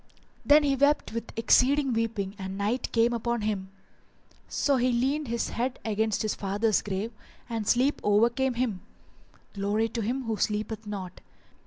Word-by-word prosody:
Then 295 +1 +6
he 280 -1 +2
wept 285 -2 +2
with 230 0 -5
exceeding 265 +4 +3
weeping 225 -4 -1
and 190 0 -5
night 215 +5 -1
came 235 +1 +3
upon 235 0 -1
him; 205 -3 -2 0.8
so 280 -2 +1
he 250 +1 +2
leant 270 +5 0
his 235 0 -1
head 250 +2 -2
against 220 0 0
his 215 - 0
father's 205 +2 0
grave 200 +3 -3 0.4
and 225 -3 -3
sleep 260 +4 +2
overcame 235 +5 +2
him: 230 -7 -1 0.7
Glory 205 +3 0
to 230 +1 -3
him 250 +5 -2
who 225 -2 -2
sleepeth 215 +1 -2
not! 190 -3 -6
230 Hz, 155 wpm, -27 LUFS, 210-250 Hz, 0.8 s, Then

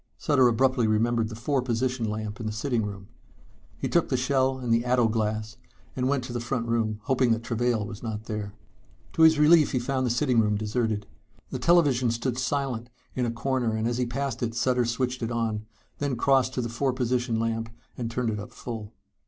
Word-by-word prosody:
Sutter 135 -5 +4
abruptly 125 0 +2
remembered 115 +1 +1
the 110 - -7
four 130 +4 0
position 125 -1 -1
lamp 105 -1 -4
in 115 - -4
the - - -2
sitting 115 +2 -1
room. 100 -2 -6 0.7
He - - -2
took 170 - +2
the 130 - +1
shell 130 +1 +1
and 125 -3 0
the 115 +1 +2
ato 125 -1 +3
glass 110 0 -2 0.4
and 130 0 0
went 140 -2 +1
to 125 -1 -6
the 120 - -2
front 120 0 -2
room, 110 -2 0
hoping 130 -1 +2
that 115 0 -3
Travail 115 -1 0
was 105 0 -8
not 110 -2 -4
there. 105 -2 -5 0.6
To - - 0
his 160 -1 +7
relief 150 +1 +5
he - - +2
found 130 +1 0
the - - 0
sitting 120 0 +2
room 105 -1 +2
deserted. 110 0 -1 0.5
The 130 - -3
television 135 -5 +4
set 115 - 0
stood 125 -1 -1
silent 130 -3 -2 0.2
in 125 -2 0
a - - -1
corner 120 -1 -1
and 110 +1 0
as 120 +1 -1
he 125 - 0
passed 130 0 -3
it 115 -1 -2
Sutter 125 0 +2
switched 125 +2 -1
it 115 - -1
on, 110 -2 -2 0.3
then 140 -2 -1
crossed 130 +1 +2
to 125 - 0
the 120 - -2
four 130 +3 0
position 125 -2 0
lamp 115 0 -1 0.3
and 120 -2 -3
turned 115 -1 -1
it 105 - -3
up 105 - -8
full. 110 -3 -7
120 Hz, 215 wpm, -26 LUFS, 110-130 Hz, 0.7 s, his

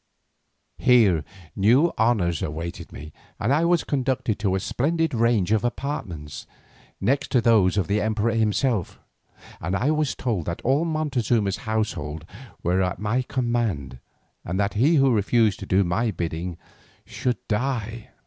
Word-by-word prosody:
Here 105 - +4 0.3
new 125 - +4
honours 105 -8 +1
awaited 80 +3 -5
me, 75 +4 -10 0.2
for 115 - 0
I 160 +3 +2
was 175 0 +3
conducted 130 -5 -1
to 100 -2 0
a - - +1
splendid 160 - 0
range 115 -5 +2
of 110 -2 +2
apartments, 100 - -4 0.5
next 140 +3 0
to 125 - +5
those 110 -5 +3
of 100 - +2
the 105 +1 0
emperor 110 +1 0
himself, 110 -2 0 0.6
and 85 +5 -2
I 130 +9 +1
was 155 -2 0
told 110 -10 -2
that 85 - -3
all 140 +6 +2
Montezuma's 125 - 0
household 80 -8 -2 0.4
were 90 +2 +2
at 90 -1 -1
my 105 +5 0
command 120 - -2 0.4
and 90 +3 -3
that 100 0 0
he 140 +10 +3
who 135 -3 +4
refused 110 0 +2
to - - -7
do 95 +2 +3
my 95 +7 0
bidding 85 -2 -4 0.5
should 125 -3 -2
die. 115 -1 -2
110 Hz, 150 wpm, -24 LUFS, 95-125 Hz, 0.6 s, to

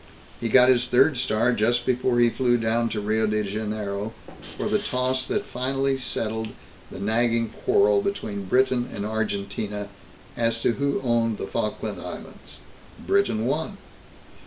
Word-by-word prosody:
He 115 - -2
got 125 +2 +7
his 125 -1 +4
third 130 +4 +4
star 120 0 +2
just 120 +3 +1
before 125 -1 +1
he 120 -1 +4
flew 120 -1 +2
down 115 +1 +1
to 110 - -2
Rio 110 +1 +1
de 105 0 0
Janiero 105 0 -3 0.4
for - - -2
the - - +2
toss 130 +1 -1
that 210 0 -1
finally 135 0 -1
settled 110 -4 -2 0.4
the - - -9
nagging 115 +3 +1
quarrel 400 - +3
between 110 - -3
Britain 125 +3 +2
and 100 - -4
Argentina 105 -1 -3 0.5
as 115 -1 +1
to - - +3
who 140 +3 -1
owned 115 -3 +1
the - - -4
Falkland - - -3
Islands. - - -9 0.5
Britain 195 - +2
won. 160 - -2
120 Hz, 150 wpm, -25 LUFS, 110-130 Hz, 0.5 s, got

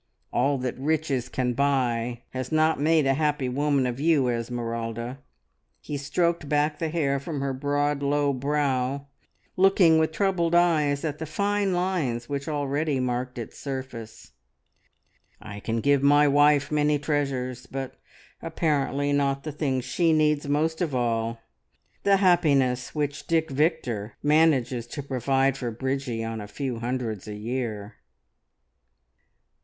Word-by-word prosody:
`All 135 +2 +2
that 125 0 -3
riches 140 -4 -1
can 125 -1 -1
buy' 125 -3 0
has 130 -1 -5
not 155 0 +2
made 155 0 +3
a 135 - +3
happy 150 -2 0
woman 140 +1 +1
of 125 0 -3
you, 145 -4 +3
Esmeralda." 115 +1 -3 0.6
He 150 - -6
stroked 170 +2 -1
back 150 0 +1
the 165 - -1
hair 140 -4 0
from 145 +1 -5
her 135 0 -1
broad, 145 +1 0
low 145 0 +1
brow, 140 0 -1 0.5
looking 185 -4 +5
with 160 0 +1
troubled 175 -2 +1
eyes 155 -4 +3
at 150 -1 -3
the 160 - -4
fine 200 +4 0
lines 165 -11 -1
which 140 0 -4
already 145 -1 -1
marked 125 0 -2
its 115 - -7
surface. 130 -5 -7 1.1
"I 105 -1 -8
can 115 +2 -2
give 140 +1 +3
my 145 +1 +5
wife 145 +1 +4
many 150 0 +2
treasures, 135 -4 -2
but 135 -1 -5 0.5
apparently 145 -3 0
not 140 -1 +1
the 155 - -4
thing 140 -3 -1
she 165 +5 +1
needs 150 -2 +2
most 160 +3 0
of 155 -6 -1
all 115 -1 -1 0.6
the 200 0 +4
happiness 140 -10 +2
which 145 -1 -2
Dick 160 -2 +1
Victor 130 - -1
manages 145 -6 +2
to 140 +4 -6
provide 135 0 +1
for 125 -3 -3
Bridgie 130 0 -3
on 115 -1 -4
a 105 - -7
few 125 +2 -4
hundreds 115 -4 -3
a 105 - -5
year!" 110 -2 -4
140 Hz, 140 wpm, -26 LUFS, 125-150 Hz, 1.1 s, looking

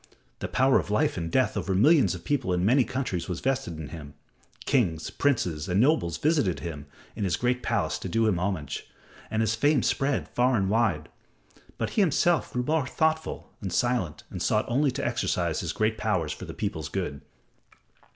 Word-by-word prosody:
The - - -3
power 130 +1 +3
of - - -5
life 105 +1 +1
and 85 -2 -3
death 130 +6 +2
over 95 -1 -1
millions 120 - +5
of 90 - -9
people 135 -10 0
in 90 +1 +1
many 130 +5 +5
countries 110 -10 -3
was 90 - -3
vested 130 -11 -1
in 75 -2 -7
him; 75 -3 -9 0.5
kings, 90 - +1
princes 90 - 0
and 90 +2 +2
nobles 115 - +2
visited 145 - +1
him 75 -4 -6 0.3
in - - -3
his 90 -3 +1
great 125 +1 0
palace 115 -4 -1
to 95 - -5
do 115 +5 +2
him 95 -5 +1
homage, 90 -6 -3 0.4
and 110 +1 0
his 110 0 +1
fame 140 +4 +2
spread 135 +1 0
far 125 +1 +2
and 95 -1 0
wide. 110 -9 +1 0.7
But - - -2
he 215 - +2
himself 175 -1 +2
grew 125 - -1
more 150 0 0
thoughtful 160 +3 -1
and 95 -3 -4
silent 120 -8 0
and - - -5
sought - - +2
only 140 +4 +2
to - - -3
exercise - - 0
his - - -2
great 110 0 0
powers - - 0
for - - -8
the - - -8
people's - - -3
good. 70 -1 -3
110 Hz, 190 wpm, -27 LUFS, 90-135 Hz, 0.7 s, millions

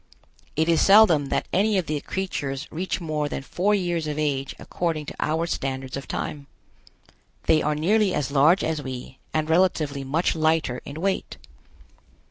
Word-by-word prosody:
It 160 +1 +1
is 165 -2 +3
seldom 195 -8 +6
that - - -1
any 205 +2 +3
of 185 - 0
the 150 -1 -2
creatures 150 -7 -3
reach 180 +4 -2
more 155 -3 -2
than 135 - -4
four 200 +8 +1
years 175 -5 -1
of 150 -1 -3
age 140 -3 -1
according 165 -4 -3
to - - -7
our 160 +2 0
standards 135 -5 -3
of 140 - -6
time. 145 -2 -4 1.0
They 155 - +3
are 150 0 0
nearly 200 +6 +2
as 150 -4 -1
large 150 +7 +4
as 160 -2 -1
we 130 -1 -7
and 155 -1 0
relatively 160 -5 +1
much 155 +7 0
lighter 155 -5 +1
in 150 +3 -7
weight. 195 +1 -1
155 Hz, 165 wpm, -24 LUFS, 140-175 Hz, 1.0 s, seldom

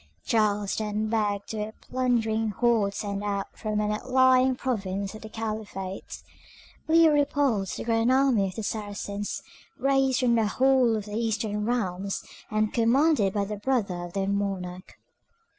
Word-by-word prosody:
Charles 210 -3 +1
turned 215 0 -2
back 205 -2 -1
a 215 0 -4
plundering 225 -4 0
horde 210 -2 +1
sent 200 -1 -3
out 200 -1 -3
from 215 -2 -2
an 210 0 0
outlying 260 +3 +3
province 200 -6 -3
of 215 - -10
the 220 - -9
Caliphate. 215 -4 -5 0.6
Leo 325 0 +6
repulsed 280 - +1
the - - -4
grand 230 +1 +2
army 260 -7 +3
of 185 - -7
the 220 - -4
Saracens, 205 -1 -4 0.3
raised 270 -1 +2
from 245 -2 +3
the 225 -2 +3
whole 255 0 +3
of 210 -2 -3
their 210 0 -6
eastern 215 -2 -1
realms, 195 -5 -2 0.3
and 215 0 0
commanded 240 -1 +3
by 205 -1 0
the 210 +1 -5
brother 200 -6 -1
of 175 0 -8
their 195 -1 -1
monarch. 190 -2 -3
215 Hz, 150 wpm, -27 LUFS, 200-245 Hz, 0.6 s, Leo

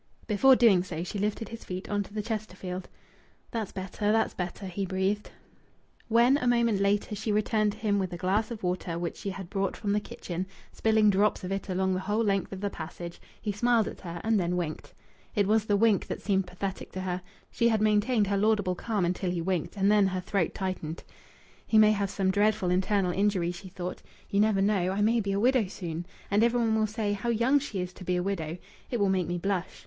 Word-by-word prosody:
Before 260 +5 +5
doing 220 -8 +5
so 170 -3 -4
she 200 +3 -4
lifted 210 +2 -2
his 230 0 -8
feet 185 +1 -6
on 205 0 0
to 200 - -8
the 210 0 -3
Chesterfield. 190 -4 -5 0.6
"That's 225 -4 -3
better. 195 +2 -2
That's 220 0 +2
better," 180 +2 -5
he 190 +1 -3
breathed. 190 +2 -1 0.8
When, 235 +4 +5
a 250 - -1
moment 235 -4 +3
later, 200 +1 +1
she 215 +1 -2
returned 215 0 +2
to - - -12
him 210 -2 +1
with 185 -2 -2
a 175 - -5
glass 195 +5 +1
of 230 -4 -7
water 180 -2 -2
which 170 -1 -3
she 200 - -4
had 190 -1 -6
brought 195 -1 -1
from 205 - -2
the 210 - +2
kitchen, 185 -3 -5 0.2
spilling 220 -1 +3
drops 200 +1 +2
of 185 - -4
it 195 0 -3
along 190 0 +1
the 185 - 0
whole 210 +4 0
length 195 -3 0
of 195 -1 -6
the 205 - 0
passage, 170 +1 -7 0.2
he 210 - -2
smiled 230 +2 +2
at - - -8
her 170 -2 -6
and 225 -1 +2
then 180 0 0
winked. 160 -3 -4 0.4
It 205 -2 +3
was 215 +1 +2
the 205 -1 +2
wink 220 -2 +3
that - - -5
seemed 195 -2 +1
pathetic 190 +2 -5
to 185 - -4
her. 185 -1 -2 0.3
She 235 -1 +2
had 220 -1 +2
maintained 215 +1 +3
her 200 0 0
laudable 205 -2 +2
calm 205 0 -1
until 180 +1 -1
he 175 -1 -1
winked, 180 +2 -2
and 195 +1 +3
then 205 -2 +5
her 185 -1 -2
throat 180 -2 -1
tightened. 185 -4 -4 0.6
"He 220 - +3
may 215 0 +7
have 200 -2 0
some 190 -1 +1
dreadful 205 -2 +2
internal 190 0 +2
injury," 190 -2 +1
she 185 +2 -9
thought. 180 -1 -6 0.3
"You 200 - +2
never 210 -2 +3
know. 195 -3 +2
I 200 - -1
may 230 +3 +3
be 200 -2 -1
a 195 - 0
widow 245 -2 +3
soon. 175 -2 -5 0.2
And 205 +2 +4
every 235 +1 +3
one 225 -2 +2
will 215 0 +2
say, 210 -1 -1
'How 205 +4 -3
young 240 +5 +3
she 215 -9 -4
is 180 0 -5
to 185 - -11
be 180 0 0
a 180 - 0
widow!' 170 -4 -2 0.3
It 240 - -1
will 200 - +3
make 185 -3 +1
me 175 +1 -2
blush. 185 0 -2
200 Hz, 230 wpm, -28 LUFS, 185-215 Hz, 0.8 s, may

